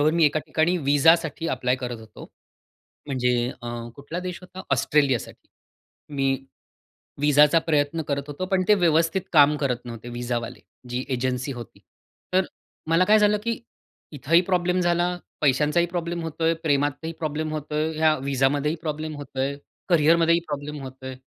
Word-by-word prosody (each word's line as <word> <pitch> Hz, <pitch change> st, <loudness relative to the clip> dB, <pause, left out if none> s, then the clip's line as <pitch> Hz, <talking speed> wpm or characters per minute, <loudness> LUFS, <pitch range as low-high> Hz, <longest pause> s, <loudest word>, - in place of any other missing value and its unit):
बरोबर 150 Hz, +1 st, +4 dB
मी 165 Hz, 0 st, +3 dB
एका 150 Hz, +1 st, +3 dB
ठिकाणी 160 Hz, +3 st, +1 dB
व्हीसासाठी 160 Hz, +2 st, +3 dB
अप्लाय 125 Hz, 0 st, 0 dB
करत 125 Hz, -2 st, -5 dB
होतो. 110 Hz, -1 st, -12 dB, 0.8 s
म्हणजे 125 Hz, -3 st, +1 dB, 0.3 s
अ, 120 Hz, -, -6 dB, 0.3 s
कुठला 145 Hz, +5 st, -6 dB
देश 180 Hz, -1 st, -5 dB
होता? 185 Hz, +1 st, -10 dB
ऑस्ट्रेलियासाठी. 135 Hz, -2 st, +1 dB, 0.7 s
मी 135 Hz, -1 st, +1 dB, 0.9 s
व्हीसाचा 150 Hz, +2 st, +5 dB
प्रयत्न 155 Hz, 0 st, 0 dB
करत 140 Hz, -1 st, -1 dB
होतो, 145 Hz, +5 st, -4 dB
पण 190 Hz, 0 st, +1 dB
ते 210 Hz, -, +7 dB
व्यवस्थित 165 Hz, -1 st, +2 dB
काम 150 Hz, -1 st, +6 dB
करत 125 Hz, -4 st, -2 dB
नव्हते 120 Hz, 0 st, -8 dB
व्हीसावाले, 120 Hz, -1 st, -4 dB, 0.3 s
जी 125 Hz, +1 st, -2 dB
एजन्सी 125 Hz, +1 st, -1 dB
होती. 120 Hz, -3 st, -9 dB, 0.5 s
तर 185 Hz, 0 st, +3 dB, 0.4 s
मला 165 Hz, +2 st, +4 dB
काय 215 Hz, +2 st, +5 dB
झालं 210 Hz, 0 st, +4 dB
की 230 Hz, 0 st, -2 dB, 0.5 s
इथंही 155 Hz, +4 st, +3 dB
प्रॉब्लेम 180 Hz, 0 st, 0 dB
झाला, 175 Hz, 0 st, +2 dB, 0.3 s
पैशांचाही 150 Hz, +4 st, +3 dB
प्रॉब्लेम 170 Hz, 0 st, -3 dB
होतो 160 Hz, 0 st, -5 dB
आहे, 165 Hz, +1 st, +4 dB
प्रेमातही 145 Hz, +1 st, 0 dB
प्रॉब्लेम 155 Hz, 0 st, -2 dB
होतो 150 Hz, 0 st, -5 dB
आहे, 155 Hz, +1 st, 0 dB
या 155 Hz, -1 st, +4 dB
व्हीसामध्येही 140 Hz, +3 st, 0 dB
प्रॉब्लेम 155 Hz, 0 st, -4 dB
होतो 145 Hz, -2 st, -8 dB
आहे, 135 Hz, +1 st, 0 dB, 0.3 s
कॅरियरमध्येही 170 Hz, 0 st, +4 dB
प्रॉब्लेम 145 Hz, 0 st, -5 dB
होतो 130 Hz, 0 st, -10 dB
आहे 130 Hz, 0 st, -5 dB
150 Hz, 150 wpm, -24 LUFS, 135-165 Hz, 0.9 s, ते